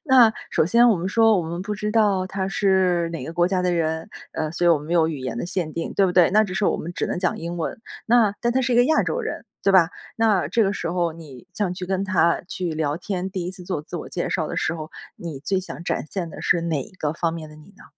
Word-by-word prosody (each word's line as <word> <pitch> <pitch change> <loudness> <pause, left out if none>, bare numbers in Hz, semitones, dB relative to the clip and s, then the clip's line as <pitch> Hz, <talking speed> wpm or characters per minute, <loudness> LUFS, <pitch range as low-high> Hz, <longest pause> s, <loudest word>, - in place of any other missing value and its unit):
那 255 -6 +6 0.2
首 - - +2
先 235 +7 +5
我 220 - +4
们 175 +2 -3
说 225 +1 +4
我 - - 0
们 170 +2 -4
不 210 - -4
知 210 +1 -3
道 205 -4 +3
他 190 0 -3
是 190 -4 +2
哪 165 -6 -5
个 160 - -6
国 175 +1 +2
家 185 0 0
的 180 - +1
人， 160 -1 -1 0.2
呃， 155 -1 -2
所 175 +2 -2
以 - - +7
我 170 - +6
们 150 +2 -10
没 - - -2
有 165 -2 +4
语 160 -3 -3
言 130 -2 -4
的 120 - -3
限 175 -3 -3
定， 165 - -4
对 200 - +4
不 185 - +2
对？ 180 -2 +5
那 215 +3 +5
只 200 -4 -4
是 190 +2 0
我 - - +2
们 170 - -6
只 - - -2
能 - - -2
讲 180 0 -1
英 170 +1 -5
文， 170 +8 -4 0.3
那 225 -3 +4
但 235 0 +1
他 260 - +2
是 250 -1 0
一 - - +3
个 245 - +6
亚 315 - +3
洲 - - -1
人， 450 - -5 0.2
对 195 - +3
吧？ 175 -3 +6 0.3
那 220 -5 +2
这 230 - +2
个 195 - +1
时 185 - -3
候 175 -2 0
你 155 -4 -12
想 195 -3 -1
去 180 0 -6
跟 190 +1 -1
他 185 -4 +2
去 180 -4 -3
聊 155 -2 -1
天， 190 +1 -4
第 185 -2 -3
1 180 - -4
次 185 -1 -10
做 175 -4 -3
自 150 - -7
我 - - -7
介 - - -3
绍 - - -1
的 - - -4
时 160 - 0
候， 155 -1 -7 0.2
你 165 -5 -7
最 185 +7 -1
想 180 -2 -8
展 - - -1
现 180 -4 -3
的 - - -9
是 170 -1 +2
哪 160 -5 -1
一 - - -13
个 155 -5 -3
方 165 0 -1
面 160 -2 -7
的 150 - -13
你 155 +2 -16
呢？ - - -16
180 Hz, 310 characters per minute, -23 LUFS, 165-200 Hz, 0.3 s, 以